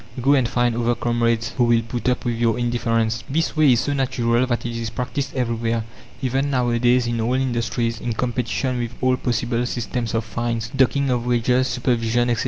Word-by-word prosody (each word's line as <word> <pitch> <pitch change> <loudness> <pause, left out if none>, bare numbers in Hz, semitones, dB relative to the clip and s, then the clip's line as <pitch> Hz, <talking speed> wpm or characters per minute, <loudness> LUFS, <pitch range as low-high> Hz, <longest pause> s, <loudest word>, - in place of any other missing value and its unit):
Go 135 +4 +3
and 130 -4 +2
find 120 -1 +1
other 120 0 +1
comrades 115 -1 0
who 120 - +4
will 115 -1 +3
put 120 +1 -2
up 125 - -1
with 120 - +1
your 115 0 +1
indifference!" 115 -2 0
This 160 +5 0
way 150 -4 +5
is 120 - +2
so 145 - -1
natural 125 -2 +1
that 120 -1 -2
it 120 -1 -3
is 115 -1 -3
practiced 135 +4 -4
everywhere, 115 -2 -1 0.4
even 135 +2 0
nowadays, 125 -1 +2
in 120 -1 -1
all 120 +3 +1
industries, 120 -2 -1
in 120 - -2
competition 125 +2 -1
with 120 0 -3
all 130 0 +2
possible 120 -1 -1
systems 120 -1 -3
of 115 0 -1
fines, 115 0 -3
docking 135 +1 +2
of 120 -1 -1
wages, 125 +2 +2
supervision, 120 -1 +1
etc. 115 - 0
120 Hz, 190 wpm, -22 LUFS, 115-125 Hz, 0.4 s, way